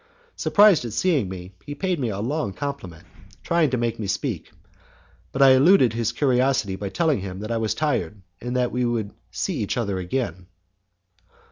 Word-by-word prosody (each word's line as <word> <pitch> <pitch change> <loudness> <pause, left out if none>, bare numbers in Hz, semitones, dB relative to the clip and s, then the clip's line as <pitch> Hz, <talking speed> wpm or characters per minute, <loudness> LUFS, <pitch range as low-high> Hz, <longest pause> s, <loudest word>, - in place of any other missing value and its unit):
Surprised 205 -7 +5
at 115 -3 -5
seeing 135 - +1
me, 90 0 -8
he 145 - -7
paid 180 +1 -1
me 125 -4 -1
a 100 - -4
long 130 -1 -2
compliment, 95 - -6 0.4
trying 170 -3 +2
to 130 - -1
make 120 -1 -2
me 105 - -3
speak, 95 - -3 0.8
but 135 - +2
I 135 - +8
eluded 130 - +5
his 115 -1 -1
curiosity 125 -5 +1
by 100 0 -5
telling 160 - +1
him 95 -1 -6
that 110 +2 -5
I 115 - 0
was 110 -1 -1
tired, 120 - -1 0.2
and 125 +1 -4
that 125 -1 +1
we 125 +1 -1
would 115 -4 -1 0.2
see - - -3
each - - -2
other 100 -5 -1
again. 90 -2 -3
120 Hz, 180 wpm, -23 LUFS, 100-140 Hz, 0.8 s, I